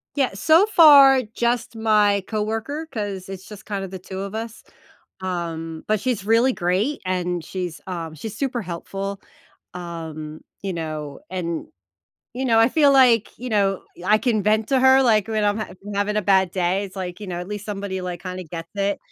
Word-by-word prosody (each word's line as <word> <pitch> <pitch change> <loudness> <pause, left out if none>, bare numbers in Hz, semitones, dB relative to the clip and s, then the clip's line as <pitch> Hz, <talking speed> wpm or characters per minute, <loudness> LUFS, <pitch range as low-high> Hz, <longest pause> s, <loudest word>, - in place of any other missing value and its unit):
Yeah, 270 -7 +1
so 315 - +5
far, 285 -9 +8
just 235 +1 -2
my 210 -3 +3
coworker, 225 +8 -3
'cause 200 -6 -4
it's 190 -1 -8
just 210 -1 -11
kinda 195 -2 -4
the 190 0 -8
2 190 +1 -7
of 200 +2 -5
us. 225 0 -6 0.6
Um, 165 -3 -4
but 215 0 +1
she's 240 -6 -1
really 230 +4 +4
great, 200 +9 -1
and 180 -2 -1
she's, 180 -3 -5
uh, 165 -4 -5
she's 210 +8 -7
super 260 -4 -1
helpful. 195 +2 -5 0.5
Um, 160 -3 -7 0.2
you 195 -1 -2
know, 155 -4 -5
and, 170 -3 -3 0.7
you 260 +2 -3
know, 225 -2 +4
I 225 +1 +6
feel 290 -1 +5
like, 245 -5 +4
you 250 +2 -6
know, 195 -3 +1 0.2
I 215 +3 +4
can 220 -3 +1
vent 215 +2 +2
to 270 -2 +3
her, 265 +1 +6
like, 220 -4 +3
when 215 -1 0
I'm 205 +1 +1
hav 215 - -6
I'm 205 - -5
having 205 +1 0
a 210 - +1
bad 190 -1 +3
day. 185 +2 0
It's 195 0 -11
like, 180 0 -5
you 205 - -6
know, 175 -2 -4
at 180 - -6
least 205 -1 -6
somebody, 200 -2 -4
like, 180 -2 -5
kinda 185 0 -6
gets 165 0 -8
it. 200 0 0
200 Hz, 190 wpm, -22 LUFS, 180-225 Hz, 0.7 s, far